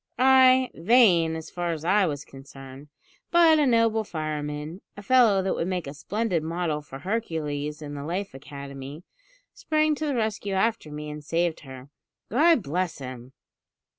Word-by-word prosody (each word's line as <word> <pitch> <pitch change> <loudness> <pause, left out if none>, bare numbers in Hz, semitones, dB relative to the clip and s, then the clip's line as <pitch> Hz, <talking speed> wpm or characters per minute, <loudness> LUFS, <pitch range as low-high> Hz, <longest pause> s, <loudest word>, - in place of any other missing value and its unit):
"Ay, 260 0 +5
vain, 175 -5 +4
as 160 -1 -8
far 175 -1 -2
as 160 0 -7
I 195 +2 +3
was 145 -2 -4
concerned; 135 +1 -12 0.4
but 330 -2 +5
a 290 - +3
noble 230 -2 +2
fireman 155 0 -5 0.2
a 205 - -9
fellow 220 -4 +4
that 190 - 0
would 165 - -2
make 180 -3 -2
a 140 - -7
splendid 195 +3 -2
model 160 -1 -2
for 140 -2 -10
Hercules 150 -5 -3
in 145 -1 -7
the 140 -1 -6
Life 185 +6 -4
Academy 140 +2 -9 0.5
sprang 310 0 +1
to 305 +1 -3
the 285 - -1
rescue 215 -3 -2
after 205 -5 0
me 150 0 -6
and 150 0 -8
saved 165 +1 -1
her. 130 0 -12 0.4
God 300 - +4
bless 175 +4 -2
him! 130 -1 -9
170 Hz, 165 wpm, -25 LUFS, 150-220 Hz, 0.5 s, Ay